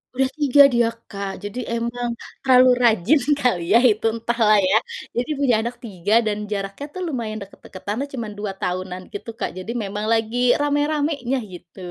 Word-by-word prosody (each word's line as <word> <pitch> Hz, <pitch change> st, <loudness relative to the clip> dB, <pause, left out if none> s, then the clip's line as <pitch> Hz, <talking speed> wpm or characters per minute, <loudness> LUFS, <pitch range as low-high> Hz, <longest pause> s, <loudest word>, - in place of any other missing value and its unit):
Udah 265 Hz, 0 st, +2 dB
3 285 Hz, 0 st, +6 dB
dia 235 Hz, -1 st, +3 dB, 0.2 s
Kak, 200 Hz, -1 st, -4 dB
jadi 205 Hz, +5 st, -5 dB, 0.2 s
emang 240 Hz, +1 st, -3 dB, 0.3 s
terlalu 255 Hz, -1 st, +6 dB
rajin 235 Hz, -, +4 dB, 0.2 s
kali 215 Hz, -10 st, +1 dB
ya -, -, +8 dB
itu 215 Hz, +1 st, -1 dB
entahlah 230 Hz, -2 st, +2 dB
ya 210 Hz, -, +5 dB, 0.4 s
jadi 245 Hz, +5 st, -1 dB
punya 255 Hz, -5 st, +3 dB
anak 235 Hz, +2 st, -4 dB
3 205 Hz, -1 st, -2 dB
dan 210 Hz, -1 st, 0 dB
jaraknya 200 Hz, +6 st, -4 dB
tuh 370 Hz, -, -6 dB
lumayan 230 Hz, -7 st, -3 dB
deket-deketanlah 200 Hz, +6 st, -6 dB
cuma 235 Hz, -4 st, -4 dB
2 205 Hz, -1 st, -3 dB
tahunan 185 Hz, 0 st, -3 dB
gitu 205 Hz, -, -7 dB
Kak -, -, -1 dB
jadi 185 Hz, +5 st, -5 dB
memang 205 Hz, +2 st, -4 dB
lagi 225 Hz, +1 st, 0 dB, 0.2 s
rame-ramenya 290 Hz, -2 st, 0 dB, 0.2 s
gitu. 175 Hz, +1 st, -13 dB
230 Hz, 160 wpm, -22 LUFS, 205-255 Hz, 0.4 s, ya